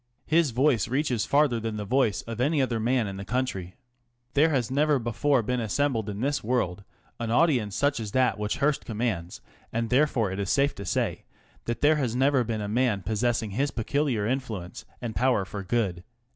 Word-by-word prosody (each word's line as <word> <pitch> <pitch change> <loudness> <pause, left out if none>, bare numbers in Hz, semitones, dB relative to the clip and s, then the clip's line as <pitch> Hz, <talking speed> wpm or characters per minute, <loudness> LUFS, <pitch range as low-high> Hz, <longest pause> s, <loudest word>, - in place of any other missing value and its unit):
His 160 -1 +3
voice 125 -3 +2
reaches 130 -3 0
farther 140 -5 +3
than 110 -1 -4
the 105 - -4
voice 115 -6 +1
of 115 +1 -5
any 145 +3 +2
other 125 -4 0
man 120 +1 +1
in 100 -1 -5
the 95 - -5
country. 100 -7 -3 0.6
There 150 +3 +4
has 130 -6 0
never 145 +1 +3
before 120 +2 +1
been 125 +3 -1
assembled 115 -1 0
in 100 +1 -5
this 140 +2 0
world 105 -5 -1 0.4
an 115 -1 -3
audience 120 - +2
such 145 0 +1
as 110 -3 -5
that 125 -5 +2
which 105 0 -2
Hearst 140 0 +1
commands, 105 -7 -3 0.3
and 115 +1 -2
therefore 125 -6 +2
it 95 - -4
is 100 -1 -2
safe 140 0 +2
to 100 - -8
say - - -1 0.4
that 120 0 -3
there 150 +1 +4
has 125 -5 -1
never 135 0 +3
been 110 -2 -3
a 105 - -3
man 110 -3 +1
possessing 110 +2 0
his 135 +8 0
peculiar 125 -2 -1
influence 110 -8 -4 0.2
and 115 -2 -4
power 125 -6 +2
for 100 +2 -6
good. 95 -4 -1
120 Hz, 195 wpm, -27 LUFS, 105-135 Hz, 0.6 s, There